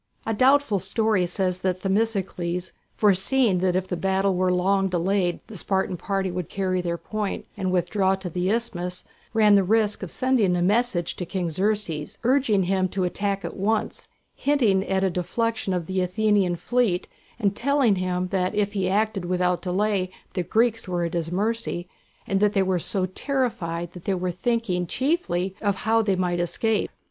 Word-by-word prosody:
A 225 - 0
doubtful 255 -2 +3
story 195 -1 +1
says 180 0 -1
that 185 0 -1
Themistocles, 190 -4 -1 0.2
foreseeing 205 +1 +3
that 180 0 +1
if 185 0 0
the 180 - -2
battle 190 +2 +1
was 185 0 +1
long 195 +2 +2
delayed 180 0 0
the 220 - -11
Spartan 190 0 -1
party 195 +1 -2
would 180 -3 -4
carry 185 -2 -1
their 170 -1 -2
point 210 +2 -4
and 190 -3 -2
withdraw 190 +2 +2
to 190 -1 -7
the 180 +2 -1
isthmus, 180 -6 -2 0.3
ran 215 -2 +5
the 200 -1 +5
risk 210 +1 +1
of 190 - -5
sending 245 -5 +2
a 175 - 0
message 200 -3 +1
to - - -3
King 180 -2 -2
Xerxes, 185 -4 -1
urging 240 -6 +3
him 185 +1 +1
to 185 +1 -2
attack 195 +2 -1
at - - -5
once, 210 +3 -1 0.3
hinting 235 -10 +2
at 190 0 +1
a 190 - +2
defection 225 +4 -1
of 180 -3 -1
the 185 +2 -1
Athenian 195 -1 +2
fleet, 225 -2 0 0.3
and 200 -4 0
telling 265 -5 +2
him 180 0 -1
that 185 +1 0
if 205 0 0
he 190 -2 0
acted 205 -1 0
without 180 0 +1
delay 190 0 0 0.2
the 180 - -1
Greeks 225 +4 +1
were 175 -1 -1
at 170 - -4
his 165 -1 -2
mercy, 210 -2 -1 0.4
and 195 - 0
that 210 0 +3
they 195 - +3
were 185 -1 +1
so 185 +2 0
terrified 185 - -2
that 180 - -11
they 195 - +1
were 180 0 -2
thinking 185 -2 -1
chiefly 195 - -1
of 200 -2 +1
how 225 +3 +2
they 200 -3 +1
might 180 -1 0
escape. 215 +6 0
190 Hz, 180 wpm, -24 LUFS, 180-215 Hz, 0.4 s, ran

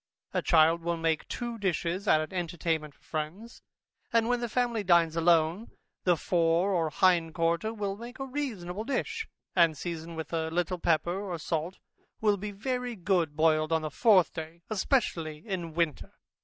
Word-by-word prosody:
A - - +1
child 165 0 +4
will 170 0 -1
make 165 -1 0
two 235 -1 -4
dishes 185 0 -1
at 155 - +5
an 155 - -6
entertainment 165 -4 -2
for - - -32
friends, 170 +10 -5 0.5
and 230 -1 +3
when 245 0 +1
the 240 -1 -3
family 235 -2 0
dines 170 -3 +4
alone, 165 +4 +2 0.4
the 175 -2 +4
fore 170 +3 +2
or 165 -3 +1
hind 170 -1 +2
quarter 170 +5 +1
will 205 -3 -3
make 235 +4 -9
a 270 - -4
reasonable 220 -9 -4
dish, 450 - -2 0.3
and 165 -4 +4
seasoned 165 0 -5
with 160 0 -6
a 160 -1 0
little 175 +2 -1
pepper 175 +3 +1
or 175 - -2
salt, 165 +3 -3 0.4
will 210 -2 +3
be 210 +2 -5
very 250 +4 -3
good 175 -5 0
boiled 155 0 +3
on 160 -1 +2
the 155 - -3
fourth 200 - +4
day, 165 +1 -7
especially 180 - 0
in 175 -5 -4
winter. 165 -4 -1
175 Hz, 170 wpm, -29 LUFS, 160-210 Hz, 0.5 s, at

